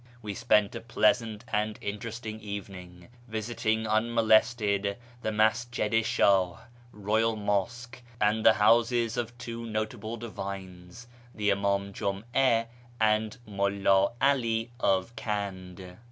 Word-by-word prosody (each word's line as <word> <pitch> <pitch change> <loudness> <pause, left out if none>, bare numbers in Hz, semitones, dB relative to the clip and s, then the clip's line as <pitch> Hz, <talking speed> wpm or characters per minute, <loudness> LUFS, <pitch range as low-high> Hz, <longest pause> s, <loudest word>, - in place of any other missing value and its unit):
We 105 -1 -4
spent 105 +1 +2
a - - -6
pleasant 115 -1 +1
and 105 0 -1
interesting 110 +1 -5
evening, 95 -4 -8 0.2
visiting 110 0 -1
unmolested 110 -2 +2 0.2
the 110 - -1
Masjid 110 +1 +1
i 115 - +5
Shdh 95 -5 +2 0.3
(Royal 110 +2 0
IMosque) 115 +5 -2 0.2
and 105 +1 +2
the 110 - +7
houses 115 +2 +3
of 120 0 -4
two 115 -1 -6
notable 110 +1 -4
divines, 95 -2 -8 0.3
the 105 -1 +1
Im; 100 0 -1
im 100 0 0
Jum'a 115 +5 +1 0.3
and 110 +1 +1
Mulla 100 0 +2
'Ali 120 -4 +1
of 95 +4 +1
Kand. 95 -4 -5
110 Hz, 115 wpm, -28 LUFS, 100-115 Hz, 0.3 s, the